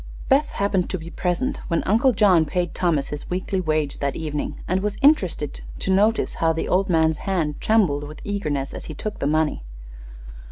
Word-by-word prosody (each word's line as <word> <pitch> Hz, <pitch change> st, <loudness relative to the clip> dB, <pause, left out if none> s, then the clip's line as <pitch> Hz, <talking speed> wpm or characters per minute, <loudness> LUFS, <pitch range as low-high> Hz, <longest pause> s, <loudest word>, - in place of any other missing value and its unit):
Beth 285 Hz, +2 st, +4 dB
happened 195 Hz, -3 st, 0 dB
to 185 Hz, -, -2 dB
be 165 Hz, 0 st, -9 dB
present 225 Hz, +10 st, -1 dB
when 170 Hz, -2 st, 0 dB
Uncle 230 Hz, +6 st, +3 dB
John 195 Hz, -7 st, +4 dB
paid 175 Hz, +2 st, -2 dB
Thomas 160 Hz, -6 st, 0 dB
his 150 Hz, -, -6 dB
weekly 185 Hz, +1 st, -1 dB
wage 155 Hz, -4 st, -1 dB
that 140 Hz, -1 st, -1 dB
evening, 150 Hz, -2 st, -4 dB
and 185 Hz, +2 st, +1 dB
was 210 Hz, 0 st, -2 dB
interested 185 Hz, -, +2 dB, 0.2 s
to 190 Hz, -, 0 dB
notice 215 Hz, +4 st, +2 dB
how 165 Hz, 0 st, +3 dB
the 160 Hz, -, -3 dB
old 190 Hz, +2 st, +1 dB
man's 160 Hz, -2 st, +3 dB
hand 160 Hz, -6 st, -1 dB
trembled 180 Hz, -10 st, +2 dB
with 150 Hz, +1 st, -10 dB
eagerness 150 Hz, -10 st, -2 dB
as -, -, -7 dB
he 155 Hz, -, -7 dB
took 215 Hz, +7 st, -5 dB
the 140 Hz, -, 0 dB
money. 155 Hz, -, +1 dB
175 Hz, 190 wpm, -23 LUFS, 155-200 Hz, 0.2 s, Beth